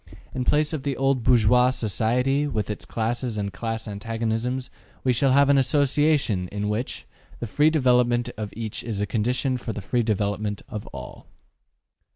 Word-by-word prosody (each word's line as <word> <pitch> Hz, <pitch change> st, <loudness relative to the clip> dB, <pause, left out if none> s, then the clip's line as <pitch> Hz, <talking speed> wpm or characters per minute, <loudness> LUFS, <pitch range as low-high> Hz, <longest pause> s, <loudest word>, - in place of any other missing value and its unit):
In 125 Hz, -1 st, -2 dB
place 150 Hz, +3 st, +2 dB
of 155 Hz, -, -2 dB
the 140 Hz, -1 st, -2 dB
old 135 Hz, -1 st, +2 dB
bourgeois 125 Hz, +1 st, +4 dB
society, 125 Hz, +5 st, 0 dB
with 105 Hz, -6 st, -2 dB
its 105 Hz, -, -7 dB
classes 115 Hz, 0 st, -2 dB
and 100 Hz, -1 st, -3 dB
class 115 Hz, -1 st, -4 dB
antagonisms, 115 Hz, +4 st, -3 dB, 0.3 s
we 130 Hz, -, +3 dB
shall 130 Hz, +3 st, +3 dB
have 140 Hz, +1 st, +5 dB
an 140 Hz, -1 st, +5 dB
association, 140 Hz, -7 st, +2 dB
in 105 Hz, +2 st, -3 dB
which; 110 Hz, +5 st, -3 dB, 0.3 s
the -, -, -3 dB
free 145 Hz, +8 st, +3 dB
development 125 Hz, -5 st, +3 dB
of 105 Hz, -1 st, -5 dB
each 110 Hz, -2 st, -4 dB
is 115 Hz, -3 st, -4 dB
the 105 Hz, -, 0 dB
condition 125 Hz, +5 st, 0 dB
for 115 Hz, -2 st, -5 dB
the -, -, -5 dB
free 120 Hz, +4 st, +1 dB
development 105 Hz, -1 st, -1 dB
of 105 Hz, -1 st, -6 dB
all. 65 Hz, -2 st, -10 dB
120 Hz, 170 wpm, -24 LUFS, 105-130 Hz, 0.3 s, have